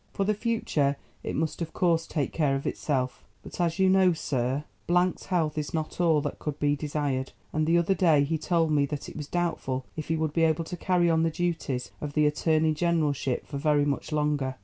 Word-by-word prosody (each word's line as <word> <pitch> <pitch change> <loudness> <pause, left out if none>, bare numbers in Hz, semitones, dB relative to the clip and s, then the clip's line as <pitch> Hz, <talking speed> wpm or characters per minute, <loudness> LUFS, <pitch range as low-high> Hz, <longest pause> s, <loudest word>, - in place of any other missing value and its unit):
For 195 - 0
the 210 +2 +2
future, 195 - 0 0.2
it - - -4
must 160 +3 -2
of 165 - -4
course 170 -3 +1
take 150 -4 -2
care 145 -4 +2
of 135 - -4
itself; 130 -4 -2 0.2
but, - - -6
as 170 0 +1
you 190 -1 +4
know, 185 -1 +5
Sir 135 -3 -1 0.3
——'s 180 +1 +2
health 160 -4 0
is 150 +2 -4
not 155 +2 -3
all 160 -4 +4
that 145 - -4
could 150 -1 -4
be 145 0 +2
desired, 145 -3 -2 0.2
and 155 0 +1
the 170 +1 +4
other 170 +3 +3
day 160 -6 +4
he 160 +2 -1
told 165 0 +1
me 145 -2 +3
that 145 0 -5
it - - -12
was 150 -2 -5
doubtful 155 -7 -2
if 155 - -5
he 165 - +1
would 155 -1 -1
be 165 - +1
able 160 +1 +2
to 170 - -6
carry 175 0 +2
on 165 -1 +3
the 165 - +2
duties 160 -7 -2
of 145 -1 -4
the 150 0 +3
Attorney 155 +1 +2
Generalship 150 -5 0
for 140 - -5
very 145 -1 +3
much 145 +2 -2
longer. 150 -3 0
155 Hz, 220 wpm, -27 LUFS, 145-170 Hz, 0.3 s, know